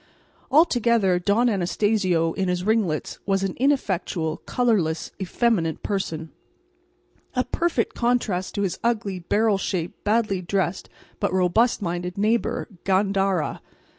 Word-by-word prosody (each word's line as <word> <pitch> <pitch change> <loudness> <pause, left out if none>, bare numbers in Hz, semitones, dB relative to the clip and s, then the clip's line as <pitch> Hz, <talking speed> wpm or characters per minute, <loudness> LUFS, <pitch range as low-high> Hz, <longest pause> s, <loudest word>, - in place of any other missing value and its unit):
Altogether, 235 - +3
Don 210 +7 +2
Anastacio 185 -4 +1
in 190 -1 -1
his 180 0 -1
ringlets 205 -7 0
was 195 -1 +1
an 195 -2 -1
ineffectual, 190 - 0
colourless, 200 -10 0
effeminate 190 -4 0
person, 165 -6 -3 1.0
a 250 - +2
perfect 335 -7 -1
contrast 235 -6 0
to 200 - 0
his 190 - -2
ugly, 215 -5 0
barrel 205 +3 +1
shaped, 180 -3 -3
badly 210 -3 +1
dressed 185 0 -2 0.3
but - - 0
robust 190 +6 +2
minded 175 +1 -3
neighbour, 225 +3 0 0.2
Gandara. 195 -2 +1
195 Hz, 115 wpm, -24 LUFS, 180-225 Hz, 1.0 s, Altogether